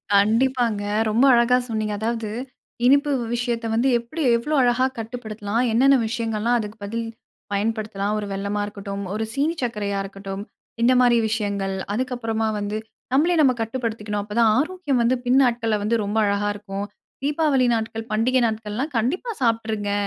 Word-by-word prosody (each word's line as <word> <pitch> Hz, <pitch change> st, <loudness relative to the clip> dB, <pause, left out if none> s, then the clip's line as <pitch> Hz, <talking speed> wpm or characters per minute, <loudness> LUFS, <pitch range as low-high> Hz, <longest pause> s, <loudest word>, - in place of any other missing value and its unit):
கண்டிப்பாங்க. 225 Hz, +1 st, +2 dB, 0.3 s
ரொம்ப 230 Hz, +5 st, +3 dB
அழகா 240 Hz, +1 st, +4 dB
சொன்னீங்க. 215 Hz, -2 st, -1 dB
அதாவது 225 Hz, -1 st, -2 dB, 0.6 s
இனிப்பு 280 Hz, +3 st, +5 dB
வ் 235 Hz, -, -4 dB
விஷயத்த 235 Hz, -1 st, -2 dB
வந்து 235 Hz, +4 st, +2 dB
எப்டி 235 Hz, +8 st, -6 dB
எவ்ளோ 300 Hz, +7 st, -1 dB
அழகா 245 Hz, +1 st, +3 dB
கட்டுப்படுத்தலாம்? 220 Hz, -1 st, -3 dB
என்னென்ன 270 Hz, +4 st, +5 dB
விஷயங்கள்லாம் 230 Hz, 0 st, 0 dB
அதுக்கு 210 Hz, 0 st, -6 dB
பதில் 230 Hz, +3 st, -3 dB, 0.5 s
பயன்படுத்தலாம்? 210 Hz, -1 st, -1 dB
ஒரு 210 Hz, -, -4 dB
வெல்லமா 200 Hz, +1 st, -2 dB
இருக்கட்டும், 200 Hz, -1 st, -6 dB
ஒரு 220 Hz, +1 st, -1 dB
சீனி 295 Hz, +4 st, 0 dB
சக்கரையா 205 Hz, -4 st, -2 dB
இருக்கட்டும். 195 Hz, 0 st, -7 dB, 0.4 s
இந்த 245 Hz, +2 st, +5 dB
மாதிரி 240 Hz, -1 st, +5 dB
விஷயங்கள், 200 Hz, -3 st, -1 dB, 0.2 s
அதுக்கப்பறமா 225 Hz, -2 st, -1 dB
வந்து 205 Hz, +1 st, -3 dB, 0.4 s
நம்மளே 330 Hz, +6 st, +3 dB
நம்ம 265 Hz, -4 st, +5 dB
கட்டுப்படுத்திக்கணும், 220 Hz, -3 st, -3 dB
அப்பதான் 220 Hz, +2 st, +2 dB
ஆரோக்கியம் 300 Hz, -4 st, 0 dB
வந்து 240 Hz, +2 st, +3 dB
பின் 250 Hz, +2 st, +4 dB
நாட்கள்ல 230 Hz, -3 st, +1 dB
வந்து 220 Hz, +3 st, +1 dB
ரொம்ப 205 Hz, +2 st, -2 dB
அழகா 200 Hz, +1 st, 0 dB
இருக்கும். 200 Hz, -1 st, -5 dB, 0.4 s
தீபாவளி 290 Hz, -3 st, +2 dB
நாட்கள், 225 Hz, 0 st, -3 dB
பண்டிகை 245 Hz, +4 st, +2 dB
நாட்கள்லாம் 220 Hz, +6 st, -3 dB
கண்டிப்பா 345 Hz, -, -1 dB
சாப்ட்டுருங்க. 220 Hz, -3 st, 0 dB
225 Hz, 145 wpm, -23 LUFS, 210-250 Hz, 0.6 s, இனிப்பு